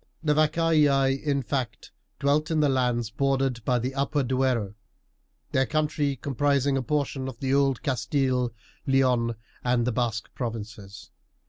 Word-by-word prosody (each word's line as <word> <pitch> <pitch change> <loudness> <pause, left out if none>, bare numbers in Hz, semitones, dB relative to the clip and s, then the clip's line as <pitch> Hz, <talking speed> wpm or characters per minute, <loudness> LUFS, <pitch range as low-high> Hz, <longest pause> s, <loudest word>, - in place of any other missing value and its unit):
The 150 -2 +3
Vacaei, 150 -3 +3
in 140 -2 0
fact, 120 -5 -4 0.3
dwelt 145 +2 +1
in 160 -1 +1
the 150 -1 +3
lands 125 -3 0
bordered 135 -2 0
by 125 +2 +2
the 125 +3 -2
upper 140 +1 0
Duero, 125 -5 0 0.8
their 130 -1 +2
country 150 -2 0
comprising 140 +1 +1
a 135 - 0
portion 140 -1 -2
of 130 - -7
old 135 -1 +2
Castille, 130 -2 0 0.4
Leon, 125 -3 +2 0.3
and 125 -1 +1
the 125 - +1
Basque 115 -1 -2
provinces. 110 -4 -7
135 Hz, 135 wpm, -26 LUFS, 120-140 Hz, 0.8 s, The